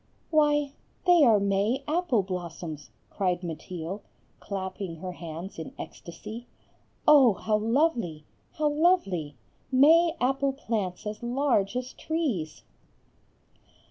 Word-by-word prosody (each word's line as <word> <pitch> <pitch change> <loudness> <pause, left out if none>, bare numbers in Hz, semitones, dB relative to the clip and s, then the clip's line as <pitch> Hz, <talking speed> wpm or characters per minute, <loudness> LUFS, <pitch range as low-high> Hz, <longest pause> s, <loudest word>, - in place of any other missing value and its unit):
"Why, 295 -2 +3 0.3
they 350 -3 +6
are 225 -6 +6
May 200 +7 +1
apple 305 - +1
blossoms," 170 -4 -6 0.2
cried 180 -2 -1
Mateel, 170 +3 -5 0.4
clapping 190 -2 -5
her 180 +3 -6
hands 170 +1 -8
in 160 - -7
ecstasy, 215 +8 -9 0.6
"Oh, 275 -7 +8
how 215 +3 0
lovely! 225 - 0 0.3
how 305 -2 +1
lovely! 290 - +1 0.4
May 320 +6 +6
apple 270 +2 +1
plants 215 -10 -3
as 210 0 -5
large 240 -4 +1
as 250 0 -3
trees." 250 - -3
215 Hz, 110 wpm, -27 LUFS, 180-285 Hz, 0.6 s, Oh